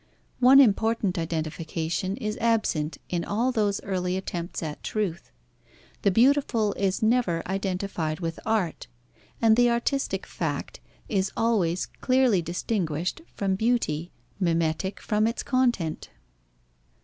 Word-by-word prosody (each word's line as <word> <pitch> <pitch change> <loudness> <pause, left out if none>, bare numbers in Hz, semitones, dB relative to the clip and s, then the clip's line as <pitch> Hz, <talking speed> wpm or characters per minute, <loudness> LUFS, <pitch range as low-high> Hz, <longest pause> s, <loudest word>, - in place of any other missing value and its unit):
One 260 +2 +8
important 220 -5 +3
identification 165 +3 -3
is 215 -4 -3
absent 215 -9 0
in 175 -1 -1
all 235 +5 0
those 210 -4 +1
early 185 -1 -1
attempts 175 -3 -4
at 150 -2 -5
truth. 185 - -3 0.7
The - - +3
beautiful 230 -1 +3
is 195 +1 -1
never 220 -8 +1
identified 185 -4 -2
with 165 -2 -4
art, 210 -7 -1 0.6
and 220 -1 +6
the 245 +1 +4
artistic 235 +4 -1
fact - - -4 0.3
is 195 -2 0
always 190 -7 +1
clearly 255 -7 +2
distinguished 175 - -2
from 195 -1 0
beauty, 190 -7 0 0.3
mimetic 170 +1 0
from 215 +1 +1
its 230 - -2
content. 240 - 0
195 Hz, 115 wpm, -26 LUFS, 170-230 Hz, 0.7 s, One